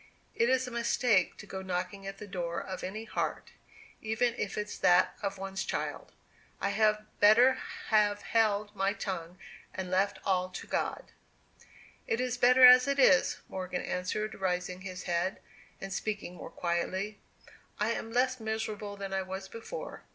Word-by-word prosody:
"It's 255 +2 +2
a 250 - -7
mistake 235 -4 +2
to - - -10
go 190 - -6
knocking 185 +1 -4
at 195 - -6
the - - -8
door 175 -3 -3
of 185 -1 -6
any 210 +4 -4
heart, - - -3 0.5
even 225 +2 +1
if 205 -4 -4
it's 210 0 -3
that 175 0 +4
of 200 -1 -3
one's 195 0 -4
child. - - -4 0.5
I - - 0
had 215 -1 +2
better 235 +5 +7 0.4
have 210 -2 +3
held 210 -2 +1
my 195 +1 +1
tongue, 180 -4 -5 0.4
and 185 -1 -4
left 195 +2 +2
all 185 -2 +1
to - - -7
God." - - -3 1.0
"It 225 - 0
is 250 -1 0
better 250 +1 +7
as 250 +1 +9
it 280 0 +1
is," 185 -10 +4
Morgan 185 -1 -4
answered 210 +4 -2
raising 180 -1 -2
his 185 -1 -7
head, 175 +2 -1 0.4
and 195 0 -5
speaking 205 -3 -3
more 180 - -9
quietly. 185 +4 -2 0.6
"I 210 +2 +1
am 225 -1 -4
less 255 +1 +1
miserable 220 -2 -4
than 195 -1 -5
I 190 - +1
was 190 +1 -6
before. 230 - -7
200 Hz, 160 wpm, -30 LUFS, 185-225 Hz, 1.0 s, as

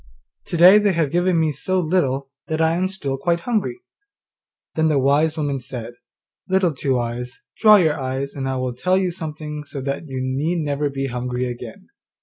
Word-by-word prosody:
To 170 - -2
day 185 +5 +8
they 205 -2 +2
have 160 -5 0
given 175 0 +2
me 160 -1 +2
so 185 +5 -1
little 140 -6 0 0.2
that 160 0 -2
I 160 0 +3
am 185 +2 0
still 145 -8 -4
quite 170 +3 0
hungry.' 245 - -2 0.9
Then 160 0 +2
the 150 -2 +2
wise 145 +4 +2
woman 145 -3 -1
said, 125 -2 -7 0.6
'Little 185 -3 +2
Two 135 -1 0
eyes, 120 +1 -4 0.2
dry 210 -4 +7
your 155 -2 +1
eyes, 135 +1 -3
and 135 -1 -3
I 130 - -1
will 130 -1 -2
tell 180 +10 +1
you 185 -2 0
something 155 -3 -6
so 145 -1 -7
that 140 +4 -4
you 130 -2 -4
need 135 +7 -1
never 145 0 -1
be 135 0 -3
hungry 125 0 -2
again. 120 -2 -8
150 Hz, 190 wpm, -21 LUFS, 130-175 Hz, 0.9 s, day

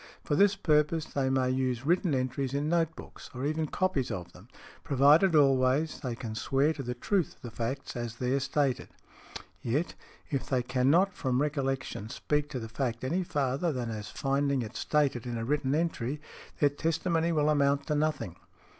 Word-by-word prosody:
For 145 - 0
this 200 +4 +5
purpose 155 -3 +2
they 135 -3 -1
may 130 -1 +2
use 130 -1 -1
written 175 -1 +2
entries 130 +1 -1
in 145 +1 0
note 165 -1 +1
books, - - -11
or 130 +2 -3
even 155 +1 0
copies 150 -7 0
of 90 -2 -5
them, 95 +5 -15 0.4
provided 150 +5 +5
always 135 +1 +3
they 125 -3 -4
can 115 -2 -6
swear 135 +7 +1
to 150 - -6
the 125 -1 -4
truth 180 +6 0
of - - -31
the 120 - -6
facts 125 +5 -4
as 120 -1 -4
there 125 +3 0
stated. 140 -1 0 0.7
Yet, 145 +9 -1 0.4
if 140 -2 -2
they 130 -2 +1
can 125 +1 +1
not 185 +6 +4
from 130 -5 0
recollection 135 -7 -2
speak 150 +4 -1
to 130 - -4
the 115 - -6
fact 115 0 -3
any 170 +8 0
farther 145 -1 0
than 125 -4 -3
as 105 -1 -6
finding 140 -1 0
it 110 +2 -8
stated 140 -6 0
in 120 -1 -3
a 115 - -3
written 140 +1 0
entry, 150 -4 -1 0.4
their 145 - +5
testimony 165 +3 0
will 150 -2 +2
amount 140 -1 +2
to - - -1
nothing. 150 - -1
140 Hz, 185 wpm, -29 LUFS, 125-150 Hz, 0.7 s, this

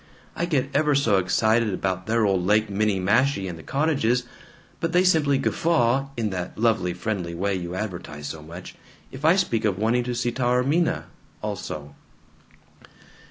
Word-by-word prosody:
I 170 - -1
get 140 -4 0
ever 150 0 +3
so 115 -8 +3
excited 110 +4 +2
about 95 0 -2
their 115 0 +2
old 95 -3 +1
Lake 105 +3 +2
Minniemashie 105 +3 +1
and 90 - -5
the 80 - -11
cottages, 135 - +1 0.6
but 165 +1 -2
they 180 +1 +5
simply 155 -6 +3
guffaw 135 -2 +1
(in 110 -3 -1
that 90 -1 -5
lovely 110 -5 +2
friendly 90 -3 -3
way 100 +3 -1
you 90 -1 -4
advertise 85 -7 -5
so 80 +2 -6
much) 85 +4 -10 0.4
if 135 +2 -10
I 160 +3 +6
speak 120 - 0
of 100 -4 +1
wanting 115 +4 +1
to 125 -1 -2
see 120 0 0
Taormina 125 +7 +1 0.4
also." 75 -1 -5
110 Hz, 160 wpm, -24 LUFS, 95-135 Hz, 0.6 s, I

